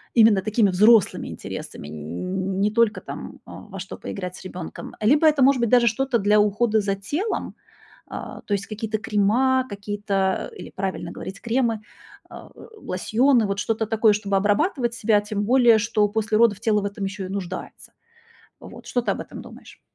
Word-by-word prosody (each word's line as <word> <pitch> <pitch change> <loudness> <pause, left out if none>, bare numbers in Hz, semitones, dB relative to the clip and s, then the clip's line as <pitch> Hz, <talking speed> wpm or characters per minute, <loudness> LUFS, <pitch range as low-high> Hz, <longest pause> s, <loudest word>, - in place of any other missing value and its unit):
именно 220 -4 +6
такими 215 0 +2
взрослыми 210 +3 +4
интересами, - - -8
н 180 - -4
не 205 +2 +2
только 230 0 +2
там, - - -8
а, - - -12
во 195 -2 -10
что 190 +1 -7
поиграть 180 -2 -6
с - - -12
ребёнком, 180 -3 -8
либо 290 +9 +4
это 300 -3 +3
может 260 -1 +4
быть 235 - +1
даже 245 0 +5
что-то 255 +2 +1
для 210 +1 +3
ухода 210 +2 +2
за 200 -1 -1
телом. 295 - -3 0.5
А, - - -8
то 205 - -4
есть 200 -1 -2
какие-то 215 0 -3
крема, 240 +6 +2
какие-то, 200 -1 -2
или - - -9
правильно 190 -1 -4
говорить 195 +2 -8
кремы, 235 -2 0 0.5
а, - - -11
э, - - -13
лосьоны, 235 - +1
вот 200 0 -2
что-то 220 +1 -1
такое, 220 0 +3
чтобы 200 -1 0
обрабатывать 240 - +1
себя. 215 -3 +2
Тем 205 0 -3
более, 240 -1 +5
что 215 -1 +1
после 215 0 0
родов 220 -3 +4
тело 215 -1 +1
в - - -4
этом 200 0 -4
ещё 195 0 -5
и - - -7
нуждается. 185 -2 -7 0.7
Вот. - - -12
Что 245 - 0
ты - - -1
об - - -5
этом - - -9
думаешь? - - -14
210 Hz, 180 wpm, -23 LUFS, 195-235 Hz, 0.7 s, именно